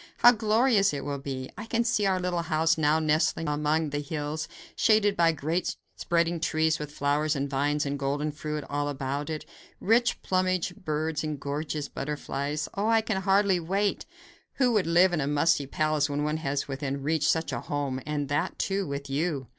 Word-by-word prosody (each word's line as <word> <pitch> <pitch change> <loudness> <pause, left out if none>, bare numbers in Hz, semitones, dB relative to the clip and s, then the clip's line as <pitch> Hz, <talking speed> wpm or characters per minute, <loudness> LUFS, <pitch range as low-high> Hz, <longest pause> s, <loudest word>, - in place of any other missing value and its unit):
How 240 - +8
glorious 220 - +3
it 140 - -5
will 140 -1 -3
be! 135 -1 -5
I 215 +3 -8
can 230 0 +1
see 230 -4 +1
our 190 -1 +1
little 180 -1 -1
house 165 0 +2
now 155 0 +3
nestling 155 +1 +1
among 150 +1 0
the 145 - -1
hills, 150 +1 -4 0.3
shaded 215 -3 +3
by 165 -1 +4
great 160 +3 -2 0.2
spreading 170 0 0
trees 160 0 +1
with 150 -1 -6
flowers 150 +2 0
and 140 0 -1
vines 145 +2 0
and 140 0 -2
golden 145 +2 -1
fruit 150 0 -4
all 145 0 -1
about 140 +1 -3
it, 155 -1 -4 0.3
rich 230 +3 +2
plumaged 185 0 0
birds 155 0 -1
and 155 -2 -3
gorgeous 145 +1 -3
butterflies. 145 +1 -3
Oh! 205 +2 -1
I 225 0 +4
can 215 -3 -2
hardly 195 -1 +3
wait. 195 +4 -1 0.5
Who 250 -3 +2
would 205 -6 +2
live 175 +2 +5
in 160 - +1
a 140 - -1
musty 145 0 +2
palace 155 0 +1
when 145 +1 -1
one 150 +1 0
has 145 -2 -2
within 140 0 -4
reach 155 +2 +1
such 160 -3 0
a 120 - -2
home, 140 -3 -3
and 150 -2 -2
that, 145 +6 -1
too, 195 -1 -1
with 140 0 -4
you?" 140 -1 -2
155 Hz, 190 wpm, -27 LUFS, 145-180 Hz, 0.5 s, How